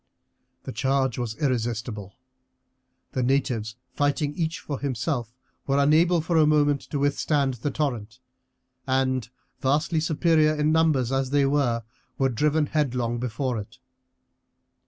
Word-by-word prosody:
The - - -6
charge 130 +2 0
was 115 -3 -3
irresistible. 115 -6 -2 1.0
The 130 - -1
natives, 120 -4 0 0.2
fighting 145 +1 0
each 160 -1 -2
for 145 -3 -5
himself, 130 -3 -2 0.4
were 135 0 +2
unable 160 +4 +4
for 165 +1 0
a 155 -1 +5
moment 145 -2 +3
to 145 - -2
withstand 140 -1 +1
the 125 +4 -3
torrent, 120 -7 -3 0.7
and, 130 -3 0 0.3
vastly 150 +5 +1
superior 155 -1 +2
in 150 0 +1
numbers 155 -6 +2
as 135 -1 0
they 140 0 +3
were, 135 -5 +1 0.3
were 135 -1 +2
driven 150 +5 +1
headlong 125 -6 -1
before 125 0 -2
it. 105 +4 -10
135 Hz, 130 wpm, -25 LUFS, 120-150 Hz, 1.0 s, a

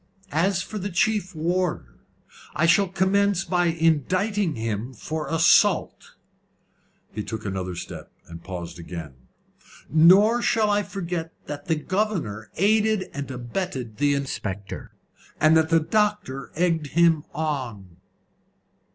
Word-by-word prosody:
"As 180 +3 +1
for 215 - -6
the 200 +2 -3
chief 195 0 0
warder, 165 - -2 0.6
I 155 - +2
shall 195 +4 +4
commence 190 +1 +1
by 180 -1 +1
indicting 170 - +1
him 115 +2 -4
for 155 +7 -4
assault." 165 0 +3 1.0
He 105 - -3
took 110 0 -6
another 95 -2 -3
step, - - -8
and 85 0 -11
paused 90 -2 -7
again. 85 -4 -7 0.8
"Nor 195 +9 +6
shall 220 -3 +2
I 205 0 +2
forget 175 -5 -5
that 145 0 -7
the 165 - +2
governor 160 - -2
aided 215 +1 +2
and 140 -1 -5
abetted 125 - -4
the 145 0 +2
inspector, 105 -8 -5 0.5
and 155 +1 +5
that 160 0 +3
the 165 -1 +5
doctor 205 -6 -1
egged 165 -2 +1
him 165 0 +3
on." 120 - -4
160 Hz, 125 wpm, -24 LUFS, 125-190 Hz, 1.0 s, Nor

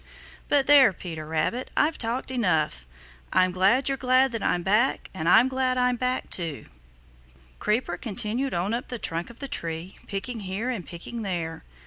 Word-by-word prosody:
But 280 -2 +4
there, 280 -6 +7
Peter 160 -3 -7
Rabbit, 160 +11 -1
I've 310 +2 +2
talked 240 +3 -2
enough. 160 - 0 0.4
I'm 185 0 +3
glad 195 +9 +3
you're 270 -1 0
glad 255 +1 +4
that 230 -2 -3
I'm 175 - 0
back, 215 +8 +1
and 165 -3 -1
I'm 225 +7 +7
glad 260 -1 0
I'm 250 0 +2
back 255 +1 -2
too." 165 -5 -2 0.9
Creeper 215 +4 0
continued 230 +3 -2
on 185 +5 -1
up 240 - -3
the 245 - -4
trunk 170 -3 -3
of 235 - -13
the 275 - -5
tree, 165 -4 -5
picking 220 +4 -4
here 200 +5 -3
and 210 -8 -5
picking 180 +7 -7
there. 170 -5 -3
220 Hz, 170 wpm, -26 LUFS, 175-255 Hz, 0.9 s, there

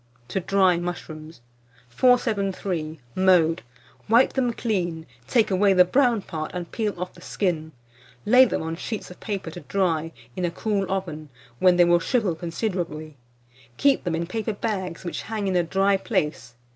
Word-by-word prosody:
TO 190 - -2
DRY 185 -1 +3
MUSHROOMS. 160 -4 -7 0.5
473. 195 - +1
Mode. 180 -3 +3 0.5
Wipe 235 +3 +5
them 250 -3 +1
clean, 175 -9 -2 0.2
take 225 -4 +2
away 195 +1 +4
the 180 -1 +6
brown 240 0 +2
part, 155 -3 -5
and 175 -1 -5
peel 210 -5 -2
off 180 0 -4
the 175 - -16
skin; 165 -5 -2 0.5
lay 250 +4 +7
them 225 - -2
on 165 0 -3
sheets 210 +3 -5
of 180 - -13
paper 195 -6 -4
to 175 - -8
dry, 165 -1 -1 0.2
in 180 - -3
a 175 - +1
cool 195 +2 -2
oven, 165 -6 -4 0.3
when 180 -1 +5
they 175 - +6
will 175 0 +4
shrivel 210 0 0
considerably. 165 -3 -4 0.6
Keep 280 -1 +3
them 175 -3 -1
in 170 +1 -2
paper 220 +4 -3
bags, 190 -5 -3
which 175 - -4
hang 215 -2 -3
in 190 - 0
a 175 - +4
dry 195 +3 +2
place. 150 - -2
185 Hz, 165 wpm, -24 LUFS, 165-205 Hz, 0.6 s, lay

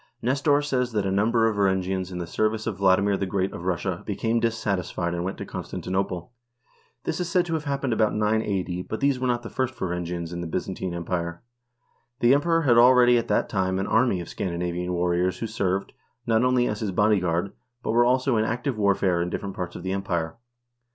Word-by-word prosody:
Nestor 145 +4 +2
says 125 -4 -1
that 105 -2 0
a 95 - 0
number 115 +3 +3
of 110 -2 -1
Varangians 95 -1 0
in 90 - -5
the 90 - -3
service 110 +5 -1
of 110 -4 -3
Vladimir 100 +1 +3
the 95 - -2
Great 95 0 -1
of 85 - -7
Russia 90 -3 -1
became 115 +1 0
dissatisfied 100 -7 -1
and 85 0 -2
went 95 +2 -3
to - - -6
Constantinople. 90 0 -4 0.7
This - - -2
is 175 -1 -2
said 180 +1 +2
to 165 - -3
have 160 -1 -2
happened 140 -3 -1
about 110 -1 +2
980, 105 -4 0
but 110 - -5
these 140 -2 +2
were 130 - 0
not 120 -1 0
the 115 - -6
first 130 0 -2
Varan 90 -3 -2
gians 85 -1 -4
in 85 - -4
the 85 - -4
Byzantine 90 +1 -3
Empire. 85 0 -3 0.8
The 120 +2 +5
Emperor 165 +3 +2
had 120 -5 +5
already 125 0 +6
at - - -4
that - - +1
time 95 -2 0
an 95 - -1
army 115 -4 +2
of 85 - -8
Scandinavian 90 0 -3
warriors 90 +1 +1
who - - -3
served, 100 -3 -2 0.3
not 115 0 +2
only 125 -1 +3
as 105 - -2
his 110 - -2
bodyguard] 95 -2 +1 0.3
but - - -1
were 120 +2 +4
also 130 +2 +2
used 110 - +2
in - - 0
active 125 0 -2
warfare 95 -3 +2
in 90 - -1
different 100 +2 -4
parts 90 -1 -5
of - - -7
the 95 - -2
Empire. 85 -4 -2
100 Hz, 210 wpm, -25 LUFS, 90-120 Hz, 0.8 s, already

